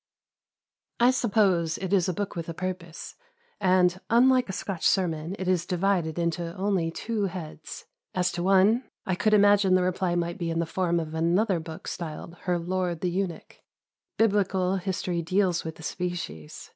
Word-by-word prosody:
I 240 Hz, +2 st, +6 dB
suppose 195 Hz, -9 st, +2 dB
it 190 Hz, 0 st, -3 dB
is 185 Hz, -2 st, +3 dB
a -, -, 0 dB
book 205 Hz, +3 st, -4 dB
with 170 Hz, -1 st, -5 dB
a 165 Hz, -, -5 dB
purpose, 185 Hz, -2 st, -5 dB, 0.5 s
and, 185 Hz, -1 st, +3 dB
unlike 250 Hz, 0 st, +4 dB
a -, -, -1 dB
Scotch 190 Hz, -2 st, -5 dB
sermon, 170 Hz, -2 st, +1 dB
it 185 Hz, -, -4 dB
is 180 Hz, -2 st, +2 dB
divided 180 Hz, -3 st, 0 dB
into 170 Hz, 0 st, -2 dB
only 190 Hz, -4 st, 0 dB
two 215 Hz, +5 st, -2 dB
heads. 180 Hz, -5 st, -7 dB, 0.3 s
As 180 Hz, -1 st, +1 dB
to 175 Hz, -, -4 dB
one, 195 Hz, +6 st, +3 dB, 0.2 s
I 190 Hz, -, 0 dB
could 215 Hz, +4 st, +3 dB
imagine 205 Hz, -2 st, +5 dB
the 185 Hz, -, +3 dB
reply 180 Hz, -1 st, 0 dB
might 170 Hz, 0 st, -2 dB
be 170 Hz, -1 st, -2 dB
in 165 Hz, -, -2 dB
the 170 Hz, -, +1 dB
form 170 Hz, 0 st, 0 dB
of 160 Hz, -1 st, -5 dB
another 175 Hz, +4 st, +2 dB
book 160 Hz, 0 st, -9 dB
styled 170 Hz, 0 st, -6 dB
"Her 180 Hz, -2 st, +1 dB
Lord 175 Hz, -1 st, -2 dB
the 180 Hz, -, 0 dB
Eunuch." 180 Hz, -3 st, -4 dB, 0.6 s
Biblical 195 Hz, -3 st, +2 dB
history 180 Hz, -2 st, -2 dB
deals 180 Hz, 0 st, +1 dB
with 160 Hz, -1 st, -6 dB
the 160 Hz, -, -13 dB
species. 170 Hz, -, -5 dB
180 Hz, 170 wpm, -27 LUFS, 170-195 Hz, 0.6 s, I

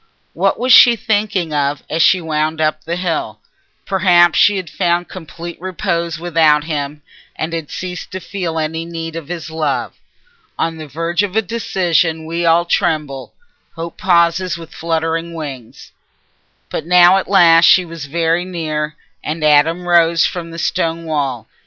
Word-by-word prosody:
What -, -, 0 dB
was 255 Hz, +1 st, +3 dB
she 240 Hz, -1 st, +8 dB
thinking 205 Hz, -7 st, -1 dB
of 145 Hz, 0 st, -1 dB
as 160 Hz, -, -1 dB
she 185 Hz, -, +5 dB
wound 155 Hz, 0 st, -2 dB
up 155 Hz, 0 st, 0 dB
the 170 Hz, +2 st, -3 dB
hill? 165 Hz, -12 st, -3 dB, 0.5 s
Perhaps 175 Hz, -3 st, +3 dB
she 205 Hz, -1 st, +4 dB
had 185 Hz, -2 st, -5 dB
found 175 Hz, +1 st, -1 dB
complete 170 Hz, -1 st, -9 dB
repose 170 Hz, -2 st, -2 dB
without 160 Hz, -3 st, +2 dB
him, 150 Hz, -1 st, -4 dB, 0.3 s
and 160 Hz, +1 st, -4 dB
had 165 Hz, -3 st, -4 dB
ceased 180 Hz, -1 st, -6 dB
to 190 Hz, -, -6 dB
feel 175 Hz, -4 st, -4 dB
any 160 Hz, +1 st, -2 dB
need 165 Hz, -1 st, -6 dB
of 165 Hz, -3 st, -7 dB
his 170 Hz, -2 st, -6 dB
love. 160 Hz, -1 st, -2 dB, 0.6 s
On 165 Hz, 0 st, -2 dB
the 155 Hz, -1 st, -8 dB
verge 165 Hz, +5 st, -2 dB
of 205 Hz, -1 st, -3 dB
a 220 Hz, -, +3 dB
decision 175 Hz, -7 st, -1 dB
we 170 Hz, +1 st, -2 dB
all 170 Hz, +1 st, +3 dB
tremble: 150 Hz, -6 st, -2 dB, 0.4 s
hope 165 Hz, 0 st, -7 dB
pauses 175 Hz, 0 st, +2 dB
with 165 Hz, -1 st, -12 dB
fluttering 165 Hz, 0 st, -2 dB
wings. 135 Hz, -7 st, -9 dB, 0.8 s
But 155 Hz, -, -4 dB
now 180 Hz, +1 st, +6 dB
at 190 Hz, -, -3 dB
last 170 Hz, -4 st, +6 dB
she 185 Hz, -, +5 dB
was 165 Hz, -3 st, -8 dB
very 165 Hz, +3 st, 0 dB
near, 155 Hz, -4 st, -4 dB, 0.3 s
and 155 Hz, +1 st, -4 dB
Adam 160 Hz, +4 st, +3 dB
rose 170 Hz, -1 st, +4 dB
from 170 Hz, -2 st, -4 dB
the 165 Hz, -, -9 dB
stone 165 Hz, 0 st, -2 dB
wall. 140 Hz, -7 st, -2 dB
165 Hz, 160 wpm, -17 LUFS, 155-175 Hz, 0.8 s, she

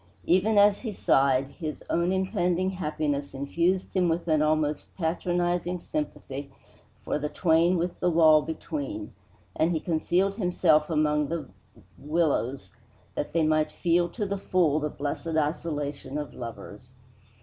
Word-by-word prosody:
Even 195 Hz, +5 st, +3 dB
as 205 Hz, 0 st, +6 dB
he 225 Hz, -, -4 dB
sighed, 135 Hz, -7 st, +2 dB
his 155 Hz, -4 st, -6 dB
own 170 Hz, +2 st, +1 dB
impending 185 Hz, -1 st, 0 dB
happiness 150 Hz, -5 st, -2 dB
infused 170 Hz, +8 st, -1 dB
him 180 Hz, -2 st, +3 dB
with 170 Hz, +1 st, -1 dB
an 155 Hz, -2 st, +3 dB
almost 155 Hz, -1 st, +1 dB
patronizing 175 Hz, +1 st, -1 dB
sympathy 145 Hz, -, -5 dB, 0.5 s
for -, -, -1 dB
the 150 Hz, 0 st, -2 dB
twain 170 Hz, +2 st, +3 dB
with 175 Hz, +1 st, -2 dB
the 180 Hz, -, +2 dB
wall 160 Hz, -2 st, +6 dB
between, 295 Hz, -, -5 dB, 0.4 s
and 165 Hz, +2 st, +2 dB
he 160 Hz, -, 0 dB
concealed 175 Hz, +4 st, +1 dB
himself 175 Hz, -6 st, +2 dB
among 150 Hz, -2 st, +1 dB
the 165 Hz, 0 st, -4 dB, 0.5 s
willows 140 Hz, -, -1 dB, 0.4 s
that -, -, -3 dB
they 165 Hz, -1 st, +2 dB
might 155 Hz, 0 st, +2 dB
feel 175 Hz, 0 st, +1 dB
to 210 Hz, +2 st, -3 dB
the 200 Hz, 0 st, -3 dB
full 165 Hz, -6 st, +2 dB
the 150 Hz, 0 st, -2 dB
blessed 150 Hz, +3 st, -3 dB
isolation 145 Hz, -3 st, -2 dB
of 150 Hz, -1 st, -5 dB
lovers. 120 Hz, 0 st, -9 dB
165 Hz, 140 wpm, -27 LUFS, 150-180 Hz, 0.5 s, as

